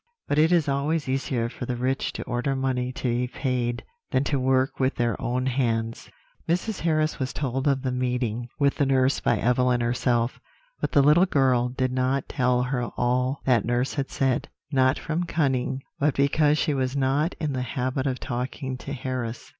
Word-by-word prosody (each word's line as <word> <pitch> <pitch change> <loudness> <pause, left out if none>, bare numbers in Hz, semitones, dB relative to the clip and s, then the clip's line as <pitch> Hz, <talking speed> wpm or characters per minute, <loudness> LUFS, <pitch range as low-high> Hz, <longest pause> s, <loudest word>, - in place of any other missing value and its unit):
But 145 - +1
it 160 +2 +4
is 170 -4 +3
always 145 +3 0
easier 130 -3 -1
for 120 +1 -7
the 125 - -1
rich 130 +2 -1
to - - -5
order 125 +3 -1
money 130 -1 -1
to 130 - -9
be 120 +1 0
paid 125 -2 -2 0.3
than 130 - +1
to 140 -1 0
work 130 +1 +1
with 130 0 +1
their 120 -2 0
own 125 0 -1
hands. 115 -3 -1 0.4
"Mrs. 185 +5 0
Harris 155 -2 +1
was 130 0 -2
told 135 -1 -2
of 135 -1 +1
the 130 - 0
meeting 125 -2 -1
with 140 -2 +2
the 140 - +2
nurse 135 0 +3
by - - +1
Evelyn 125 0 +2
herself; 120 0 0 0.4
but - - -2
the 140 - +5
little 160 +6 +5
girl 130 -6 +2
did 130 0 -1
not 130 +1 0
tell 125 -1 +1
her 125 -1 -1
all 125 +2 0
that 120 -6 +3
nurse 120 +2 0
had 140 -2 -2
said, 135 -3 0 0.2
not 130 -1 +3
from 165 +2 -2
cunning, 135 -5 0 0.2
but 145 0 +2
because 145 +2 +3
she 155 -1 +1
was 130 -1 -1
not 140 +5 +1
in 150 -3 -1
the 130 - -2
habit 130 +2 -2
of 130 -2 -1
talking 130 +1 -4
to 140 - -6
Harris. 125 -3 -4
130 Hz, 190 wpm, -25 LUFS, 125-140 Hz, 0.4 s, the